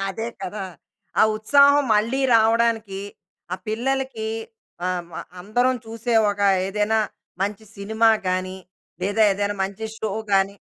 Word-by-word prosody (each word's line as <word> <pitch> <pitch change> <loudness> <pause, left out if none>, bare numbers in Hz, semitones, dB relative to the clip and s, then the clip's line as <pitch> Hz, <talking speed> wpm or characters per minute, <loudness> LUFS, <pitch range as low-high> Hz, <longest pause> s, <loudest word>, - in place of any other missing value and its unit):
అదే 225 +4 -4
కదా. 195 +1 -4 0.6
ఆ - - +7
ఉత్సాహం 280 +6 +5
మళ్ళీ 230 +6 +1
రావడానికి 225 -3 +2 0.5
ఆహ్, 185 - -3
పిల్లలకి 245 0 -2 0.6
ఆహ్, 180 -1 -1
మ - - -18 0.3
అందరం 245 +7 +1
చూసే, 230 +2 -4 0.2
ఒక 205 0 -6 0.3
ఏదైనా 210 +2 +1 0.4
మంచి 210 +2 -3
సినిమా 220 +3 +2 0.2
గాని, 185 +1 -1 0.5
లేదా 205 +3 +2
ఏదైనా 205 +1 -2
మంచి 200 +3 -6
షో 215 -2 -2 0.2
గాని 195 0 +3
215 Hz, 125 wpm, -23 LUFS, 195-230 Hz, 0.6 s, ఆ